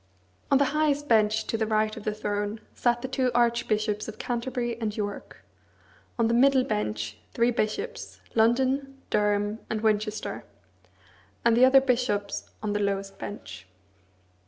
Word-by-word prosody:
On 275 Hz, -, +5 dB
the 280 Hz, -, +3 dB
highest 295 Hz, -1 st, +1 dB
bench 220 Hz, -2 st, +3 dB
to 225 Hz, -, -2 dB
the 220 Hz, -, 0 dB
right 215 Hz, 0 st, +1 dB
of 220 Hz, -, -9 dB
the 215 Hz, -, +1 dB
throne 205 Hz, 0 st, -2 dB
sat 240 Hz, 0 st, +1 dB
the -, -, -2 dB
two 260 Hz, -1 st, 0 dB
archbishops 220 Hz, -3 st, +1 dB
of 215 Hz, -, -7 dB
Canterbury 240 Hz, 0 st, -2 dB
and 215 Hz, -1 st, -2 dB
York; 205 Hz, -1 st, -5 dB, 0.7 s
on 230 Hz, -1 st, +3 dB
the 230 Hz, -, +1 dB
middle 260 Hz, +2 st, +5 dB
bench 105 Hz, -, -3 dB, 0.2 s
three 235 Hz, +1 st, +3 dB
bishops, 405 Hz, -, -3 dB
London, 265 Hz, +4 st, +2 dB
Durham, 210 Hz, +1 st, +1 dB
and 220 Hz, -1 st, -2 dB
Winchester, 215 Hz, -, -1 dB, 1.0 s
and 235 Hz, -1 st, +5 dB
the 250 Hz, +2 st, +7 dB
other 265 Hz, +1 st, +7 dB
bishops 240 Hz, -6 st, -1 dB
on 210 Hz, -1 st, -1 dB
the 205 Hz, -, 0 dB
lowest 195 Hz, -1 st, -2 dB
bench. 105 Hz, -, -8 dB
220 Hz, 150 wpm, -27 LUFS, 205-250 Hz, 1.0 s, the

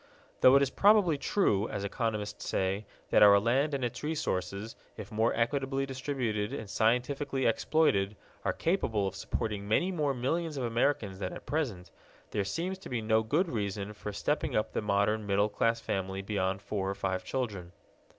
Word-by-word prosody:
Though 130 Hz, +1 st, +7 dB
it 140 Hz, -, +6 dB
is 135 Hz, -, -1 dB
probably 200 Hz, -5 st, +5 dB
true, 110 Hz, -, +1 dB
as 100 Hz, -, -4 dB
economists 105 Hz, -1 st, -3 dB
say, 95 Hz, +2 st, -1 dB, 0.2 s
that -, -, +5 dB
our 100 Hz, -1 st, +8 dB
land 135 Hz, +7 st, +1 dB
and 130 Hz, -3 st, -1 dB
its 120 Hz, 0 st, -4 dB
resources, 105 Hz, -, -3 dB, 0.2 s
if -, -, -8 dB
more 110 Hz, +2 st, +2 dB
equitably 135 Hz, +3 st, 0 dB
distributed 130 Hz, -6 st, -2 dB
and 110 Hz, -, -5 dB
scientifically 125 Hz, +5 st, 0 dB
exploited, 110 Hz, -5 st, +2 dB, 0.3 s
are -, -, +1 dB
capable 115 Hz, -, 0 dB
of 95 Hz, -, -2 dB
supporting 100 Hz, +1 st, -3 dB
many 175 Hz, -, +2 dB
more 150 Hz, -6 st, 0 dB
millions 155 Hz, +5 st, -1 dB
of 130 Hz, -, -2 dB
Americans 115 Hz, -4 st, 0 dB
than 95 Hz, -2 st, -3 dB
at -, -, -9 dB
present, 115 Hz, -, -2 dB, 0.4 s
there 105 Hz, -, 0 dB
seems 175 Hz, -, -3 dB
to -, -, -10 dB
be 125 Hz, -, -1 dB
no 110 Hz, 0 st, +3 dB
good 150 Hz, -, +1 dB
reason 105 Hz, -, -3 dB
for 105 Hz, 0 st, -6 dB
stepping 150 Hz, +8 st, -1 dB
up 110 Hz, -, 0 dB
the -, -, -1 dB
modern 105 Hz, +1 st, +1 dB
middle 100 Hz, +1 st, +2 dB
class 115 Hz, +2 st, +1 dB
family 95 Hz, -2 st, -3 dB
beyond 95 Hz, -1 st, -1 dB
four 100 Hz, -2 st, -2 dB
or 100 Hz, -, -2 dB
five 95 Hz, -1 st, -2 dB
children. 100 Hz, -7 st, -3 dB
110 Hz, 175 wpm, -30 LUFS, 100-135 Hz, 0.4 s, our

